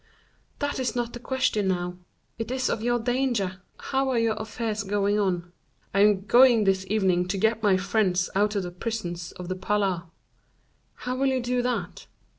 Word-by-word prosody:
"That 285 -2 -2
is 255 -1 -1
not 240 -1 -2
the 240 - -6
question 245 -5 0
now; 180 -1 -1 0.4
it 225 0 -3
is 255 0 0
of 215 - -2
your 240 +1 +1
danger; 235 -6 -1 0.2
how 270 0 -1
are 255 - +1
your 230 -1 +2
affairs 220 0 -3
going 205 +1 +1
on?" 175 -3 -1 0.4
"I 195 - +2
am 200 -1 +4
going 240 -1 +6
this 190 -1 +1
evening 185 -4 +2
to 195 +2 -2
get 220 +3 +1
my 200 -3 +4
friends 185 -2 +1
out 210 +2 +1
of 200 - 0
the 175 - -5
prisons 175 -4 -4
of 180 - -8
the 185 - -2
Palais." 190 -2 0 0.9
"How 250 0 -4
will 270 +1 +1
you 260 -1 +1
do 245 0 0
that?" 245 -1 -3
210 Hz, 185 wpm, -26 LUFS, 190-240 Hz, 0.9 s, going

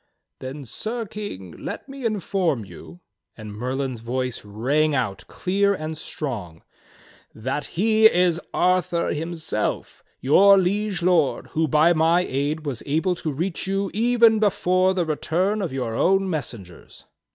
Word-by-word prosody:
"Then, 135 +2 -7
Sir 225 - -4
King, 190 - -7
let 80 - -7
me 275 -2 -8
inform 190 - 0
you," 95 - -13 0.4
and 110 -2 -8
Merlin's 130 +2 -3
voice 125 +2 -3
rang 135 +9 0
out 110 -8 -2
clear 200 +2 +1
and 155 -2 -5
strong, 115 - -6 0.7
"that 130 +6 -3
he 220 +3 +6
is 175 -3 +2
Arthur 180 -1 +1
himself, 160 -8 -3 0.2
your 195 +9 +6
Liege 195 0 0
Lord, 170 -5 +2
who 160 0 +1
by 155 +4 +4
my 165 +2 +3
aid 150 +2 -2
was 135 -5 -3
able 160 +6 +1
to 165 -3 -4
reach 170 +6 -3
you 195 0 -1
even 230 0 +4
before 185 -2 +2
the 180 -2 +1
return 180 +7 0
of 180 - -2
your 125 -4 -3
own 195 +10 +2
messengers." 115 - -6
165 Hz, 140 wpm, -23 LUFS, 130-195 Hz, 0.7 s, he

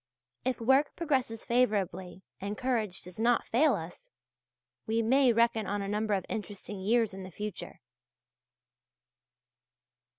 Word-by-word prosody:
If 255 -1 -1
work 265 +5 +3
progresses 260 -8 -1
favourably 190 -6 0 0.2
and 200 +2 -4
courage 235 -7 -1
does 180 +3 -11
not 235 +1 +3
fail 270 +2 +3
us, 165 -1 -8 0.8
we 225 +1 +1
may 260 +2 +4
reckon 230 -2 +2
on 205 0 -1
a - - -4
number 210 +1 0
of 190 - -3
interesting 205 -2 -5
years 220 +2 +2
in 195 - -7
the 185 - -8
future. 210 +3 -7
220 Hz, 130 wpm, -30 LUFS, 200-245 Hz, 0.8 s, may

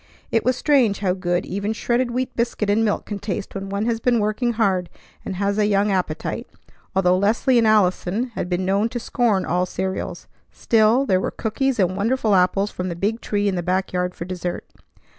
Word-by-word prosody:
It 225 - +2
was 255 0 +2
strange 255 -8 +2
how 185 -3 +1
good 175 -1 -1
even 200 +3 -2
shredded 240 +2 0
wheat 250 +2 -3
biscuit 230 -3 0
and 220 +2 +2
milk 210 -2 0
can 205 -1 -5
taste 200 0 -4
when 195 0 -5
one 200 +2 -2
has 230 -1 0
been 240 +1 +2
working 215 +3 0
hard 190 -6 +1 0.3
and 190 - -5
has 200 +2 0
a 210 - +3
young 205 0 +2
appetite, 180 -5 -2 0.5
although 180 -1 +4
Leslie 225 +6 +3
and 225 - +3
Allison 210 +2 +2
had 210 -6 -5
been 180 +1 -1
known 200 +4 +1
to 240 0 -4
scorn 225 -5 +1
all 180 +2 0
cereals. 190 +1 -4 0.3
Still, 225 +4 +3
there 185 -6 +2
were - - -1
cookies 255 +4 -1
and 185 -2 +1
wonderful 220 +2 +1
apples 195 +2 +2
from 185 0 -4
the 170 - -4
big 210 +6 -1
tree 205 -1 -1
in 200 - +1
the 180 - -1
back 185 +2 -1
yard 180 0 -1
for 170 - -6
dessert. 180 -1 -4
205 Hz, 205 wpm, -22 LUFS, 185-225 Hz, 0.5 s, although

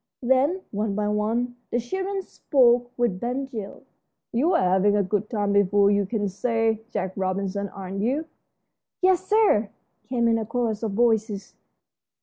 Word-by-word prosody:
Then, 275 +9 +2
one 210 0 -2
by 210 0 0
one, 230 +4 -1
the 240 - 0
children 380 +10 -3
spoke 245 -7 +2
with 235 -7 0
Ben 250 +5 -2
Gile. 220 -7 -8 0.5
"You're 315 +10 +3
having 190 +3 +3
a 205 - +2
good 205 +2 -2
time 205 -3 0
before 200 0 +4
you 200 -1 +1
can 205 -1 -1
say 225 +2 0
Jack 190 -6 -3
Robinson, 195 +1 -2
aren't 195 0 -6
you?" 270 +9 0 0.8
"Yes, 375 -1 +3
sir," 410 - +3 0.4
came 240 -2 +1
in 225 0 +2
a 220 - -3
chorus 225 -3 -1
of 220 -3 -2
voices. 220 -3 0
220 Hz, 150 wpm, -24 LUFS, 200-245 Hz, 0.8 s, before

